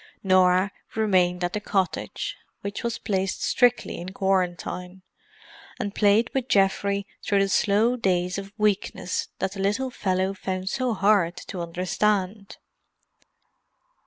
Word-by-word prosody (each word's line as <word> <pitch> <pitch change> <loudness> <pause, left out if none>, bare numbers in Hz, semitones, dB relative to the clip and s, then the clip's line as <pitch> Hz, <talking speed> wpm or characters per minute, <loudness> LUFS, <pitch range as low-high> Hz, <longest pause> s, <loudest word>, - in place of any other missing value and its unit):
Norah 185 0 +4 0.2
remained 185 -5 +2
at 175 +1 -1
the 210 - -1
cottage, 195 -3 -2 0.3
which 200 0 -4
was 235 -1 -1
placed 195 -3 -2
strictly 245 -1 +2
in 180 +2 -7
quarantine, 185 -1 -1 0.8
and 205 -4 -3
played 215 +2 +3
with 265 -2 -1
Geoffrey 200 -1 +2 0.2
through 205 - +1
the 195 - +2
slow 215 +5 +3
days 180 -4 0
of 195 0 -8
weakness 195 -3 0
that 190 0 -1
the 200 - -8
little 210 +7 0
fellow 190 -3 0
found 190 -1 -3
so 255 -2 -1
hard 195 -4 +3
to 180 - -6
understand. 190 +3 -1
195 Hz, 130 wpm, -25 LUFS, 185-210 Hz, 0.8 s, Norah